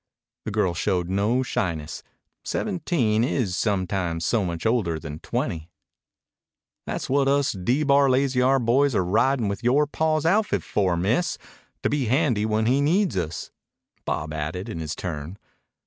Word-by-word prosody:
The -, -, -3 dB
girl 100 Hz, -4 st, +1 dB
showed 90 Hz, 0 st, -1 dB
no 105 Hz, +7 st, +1 dB
shyness. 80 Hz, -9 st, -3 dB, 0.4 s
Seventeen 145 Hz, -, 0 dB
is 120 Hz, -8 st, 0 dB
sometimes 95 Hz, -5 st, -1 dB
so 110 Hz, +1 st, +1 dB
much 85 Hz, 0 st, -4 dB
older 110 Hz, -8 st, +1 dB
than 75 Hz, -1 st, -7 dB
twenty. 80 Hz, 0 st, -3 dB, 1.2 s
"Tha's -, -, -3 dB
what 135 Hz, +1 st, +2 dB
us 140 Hz, 0 st, +2 dB
D 120 Hz, +10 st, 0 dB
Bar 140 Hz, -1 st, +4 dB
Lazy 130 Hz, 0 st, +2 dB
R 135 Hz, +2 st, +4 dB
boys 130 Hz, +2 st, +2 dB
are 95 Hz, -, +2 dB
ridin' 115 Hz, +5 st, +2 dB
with 100 Hz, +3 st, -4 dB
yore 135 Hz, +5 st, +3 dB
paw's 155 Hz, +1 st, 0 dB
outfit 205 Hz, +5 st, +2 dB
for, 95 Hz, -4 st, 0 dB
Miss 115 Hz, -, 0 dB, 0.5 s
to -, -, +2 dB
be 145 Hz, -3 st, 0 dB
handy 120 Hz, -4 st, +1 dB
when 110 Hz, 0 st, +1 dB
he 130 Hz, +4 st, +3 dB
needs 180 Hz, +6 st, +2 dB
us," 85 Hz, -3 st, -3 dB, 0.5 s
Bob 75 Hz, +1 st, -3 dB
added 80 Hz, +5 st, -4 dB
in 80 Hz, -, -5 dB
his 80 Hz, -1 st, -4 dB
turn. 80 Hz, +1 st, -5 dB
110 Hz, 155 wpm, -24 LUFS, 90-140 Hz, 1.2 s, Bar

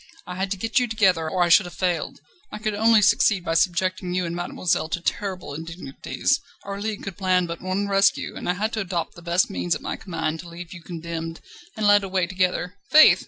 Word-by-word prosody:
I 180 Hz, -, -6 dB
had 190 Hz, +1 st, -2 dB
to 195 Hz, -, -2 dB
get 225 Hz, +6 st, +1 dB
you 250 Hz, -, 0 dB
together, 190 Hz, -8 st, +2 dB
or 180 Hz, +2 st, +2 dB
I 175 Hz, -, +1 dB
should 180 Hz, +2 st, +6 dB
have 175 Hz, -, -11 dB
failed. 180 Hz, -2 st, -2 dB, 0.3 s
I -, -, -5 dB
could 215 Hz, 0 st, -2 dB
only 220 Hz, +1 st, +4 dB
succeed 200 Hz, -2 st, +4 dB
by 165 Hz, -, 0 dB
subjecting 180 Hz, +1 st, +1 dB
you 185 Hz, -1 st, 0 dB
and 170 Hz, 0 st, -4 dB
mademoiselle 175 Hz, -2 st, -1 dB
to 175 Hz, -, -1 dB
terrible 185 Hz, -2 st, -3 dB
indignities. 165 Hz, -, -2 dB, 0.2 s
Our 200 Hz, 0 st, -5 dB
League 215 Hz, -1 st, -3 dB
could 195 Hz, -3 st, -6 dB
plan 185 Hz, -2 st, +2 dB
but 170 Hz, -1 st, -6 dB
one 185 Hz, +2 st, -1 dB
rescue, 195 Hz, 0 st, +2 dB
and -, -, -4 dB
I -, -, +3 dB
had 215 Hz, +5 st, -2 dB
to 220 Hz, -, -1 dB
adopt 175 Hz, -4 st, -2 dB
the 175 Hz, -, -13 dB
best 175 Hz, +3 st, +1 dB
means 175 Hz, -4 st, -1 dB
at -, -, -7 dB
my -, -, -4 dB
command 165 Hz, -3 st, -3 dB
to 170 Hz, -, -9 dB
have 170 Hz, +1 st, -9 dB
you 180 Hz, -, -10 dB
condemned 165 Hz, -1 st, -6 dB, 0.4 s
and 215 Hz, -, -1 dB
led 205 Hz, 0 st, +6 dB
away 190 Hz, -2 st, 0 dB
together. 185 Hz, +1 st, -1 dB
Faith!" 310 Hz, +3 st, +8 dB
185 Hz, 225 wpm, -24 LUFS, 170-200 Hz, 0.4 s, Faith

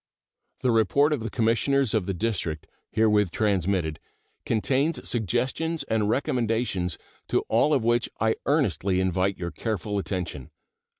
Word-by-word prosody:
The 125 Hz, -, +2 dB
report 115 Hz, +7 st, +3 dB
of 145 Hz, -, -1 dB
the 115 Hz, +1 st, -4 dB
Commissioners 115 Hz, +3 st, +1 dB
of 105 Hz, -5 st, 0 dB
the 95 Hz, -, 0 dB
District, 90 Hz, -7 st, -2 dB, 0.2 s
herewith 105 Hz, -3 st, +3 dB
transmitted, 95 Hz, -5 st, 0 dB, 0.5 s
contains 130 Hz, +5 st, +1 dB
suggestions 130 Hz, -, -1 dB
and 105 Hz, -2 st, 0 dB
recommendations, 115 Hz, -, 0 dB, 0.3 s
to -, -, +1 dB
all 120 Hz, +7 st, +2 dB
of 135 Hz, -6 st, +2 dB
which 120 Hz, +1 st, +2 dB
I 110 Hz, 0 st, +3 dB
earnestly 100 Hz, -, +1 dB
invite 95 Hz, +1 st, +1 dB
your 85 Hz, -1 st, -4 dB
careful 105 Hz, +2 st, -2 dB
attention. 90 Hz, -9 st, -4 dB
110 Hz, 130 wpm, -26 LUFS, 95-120 Hz, 0.5 s, report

